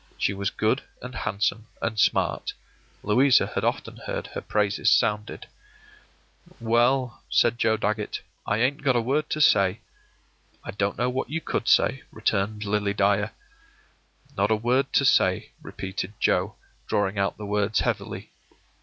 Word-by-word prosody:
She 100 - 0
was 100 0 -2
good 110 +5 0 0.2
and 125 0 -7
handsome 105 0 -2
and 110 -2 -2
smart. - - +1 0.5
Louisa 125 +5 +4
had - - -1
often - - -2
heard - - -3
her - - -6
praises 105 -1 +1
sounded. 105 -2 +1 1.1
“Well,” 120 +2 +1
said 120 0 +2
Joe 110 0 +2
Dagget, 105 0 -2 0.3
“I 100 - +1
ain't 125 +5 +1
got 135 -3 +2
a - - +4
word 140 +6 -1
to 155 - -2
say.” 105 -7 +4 0.8
“I - - -6
don't 100 0 -2
know 125 +3 0
what 130 +1 -3
you 160 +3 -2
could 125 - -3
say,” 135 - +3
returned 105 -1 -1
Lily 100 0 0
Dyer. 100 +1 +2 1.1
“Not 100 +1 +1
a 110 - +4
word 125 +5 +1
to 140 - +3
say,” - - +3
repeated 95 +1 -6
Joe, - - +1 0.3
drawing 100 0 0
out 100 - 0
the 105 - -7
words 105 +1 0
heavily. - - -3
110 Hz, 150 wpm, -25 LUFS, 100-125 Hz, 1.1 s, Louisa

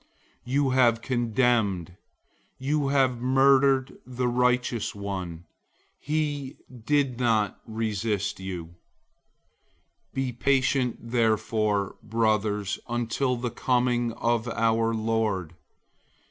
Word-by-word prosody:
005:006 125 - -5
You 140 -1 +3
have 120 -3 +3
condemned, 115 -8 0 0.6
you 140 +2 0
have 130 -3 +2
murdered 135 +1 +3
the 125 0 -2
righteous 125 -2 +1
one. 95 -4 -5 0.6
He 145 -2 -2
doesn't 120 -4 +1
resist 110 -3 -2
you. 95 -3 -5
005:007 85 - -17 1.4
Be 135 -1 -1
patient 130 -1 +1
therefore, 110 -3 +1
brothers, 105 -3 0
until 120 +2 0
the 120 0 -3
coming 120 -1 +1
of 120 0 0
the 115 -1 +1
Lord. 110 -6 0
120 Hz, 90 wpm, -26 LUFS, 110-130 Hz, 1.4 s, You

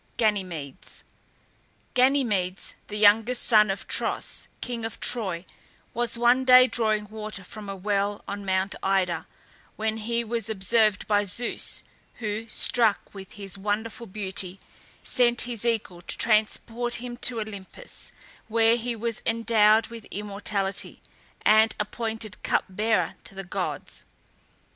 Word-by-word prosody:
GANYMEDES. 185 - -2 0.9
Ganymedes, 245 -9 +2
the 210 - -5
youngest 220 +4 +4
son 215 -3 +5
of 195 0 -3
Tros, - - -1
king 240 -2 -4
of 225 - -4
Troy, 190 -7 -1 0.5
was 240 0 0
one 240 +2 +4
day 255 -1 +8
drawing 215 -4 0
water 215 -2 -6
from 205 +2 -9
a 195 - -4
well 200 +1 -1
on 200 0 -5
Mount 190 0 0
Ida, 190 -2 +1 0.5
when 220 0 -1
he 235 +2 -1
was 230 -1 -2
observed 215 +1 +2
by 205 -1 +3
Zeus, 205 +5 -1 0.3
who, 220 0 -4
struck 225 -1 +2
with 195 -1 -10
his 195 -2 -6
wonderful 220 +3 -2
beauty, 190 -2 -4 0.4
sent 240 -1 +3
his 240 -3 -4
eagle 220 -7 -1
to - - -3
transport 230 +2 +1
him 240 0 -5
to 240 -2 -2
Olympus, 215 - -7 0.4
where 230 +1 +4
he 240 0 -3
was 230 0 -3
endowed 225 -1 +4
with 230 -2 -9
immortality, 200 -1 -3 0.4
and 220 +1 +5
appointed 220 0 -4
cup - - +1
bearer 215 +4 0
to 195 - -12
the 195 - -5
gods. 175 - -4
215 Hz, 130 wpm, -26 LUFS, 200-230 Hz, 0.9 s, day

